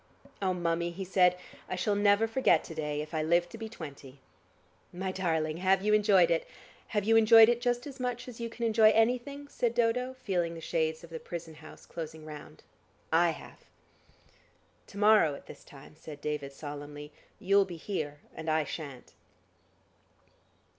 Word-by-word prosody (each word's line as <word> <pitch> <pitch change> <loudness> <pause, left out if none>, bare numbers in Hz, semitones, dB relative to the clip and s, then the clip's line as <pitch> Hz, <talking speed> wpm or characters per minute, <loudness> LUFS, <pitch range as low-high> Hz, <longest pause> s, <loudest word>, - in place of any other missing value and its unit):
"Oh, 185 -2 +1
Mummie," 170 -1 -1
he 190 +2 -6
said, 180 -1 +3 0.3
"I - - -2
shall 195 +3 0
never 205 +1 +3
forget 225 -8 +3
to - - -9
day, 150 -2 -3
if 155 - -13
I 155 - 0
live 170 +2 +2
to 230 - -10
be 225 -1 -6
twenty." 140 - -10 0.7
"My 190 +1 -4
darling, 160 -4 -1
have 190 +1 +2
you 210 - +3
enjoyed 200 -5 +5
it? 165 - 0 0.4
Have 210 -2 -1
you 225 +2 +3
enjoyed 225 0 +8
it 240 0 +1
just 245 0 0
as 280 -2 -9
much 245 -1 -3
as 245 -2 -10
you 235 0 -4
can 235 +1 -4
enjoy 220 -1 +5
anything?" 250 +5 0
said 240 -4 -1
Dodo, 245 +2 +1
feeling 180 -9 -2
the - - -7
shades 160 0 -1
of 170 - -13
the 160 - -6
prison 165 -1 -7
house 155 0 -14
closing 160 -2 -8
round. 150 -1 -11 0.5
"I 170 +1 +5
have." 165 - -8 1.3
"To 200 - -12
morrow 205 -8 +5
at - - -13
this - - -12
time," 140 +1 -15
said 155 -1 -10
David 145 -2 -4
solemnly, 145 +1 -8 0.3
"you'll 195 +1 +4
be 175 -3 -8
here 155 -5 -4
and 160 0 -5
I 155 0 +2
shan't." 145 -5 -8
180 Hz, 175 wpm, -30 LUFS, 155-220 Hz, 1.3 s, enjoyed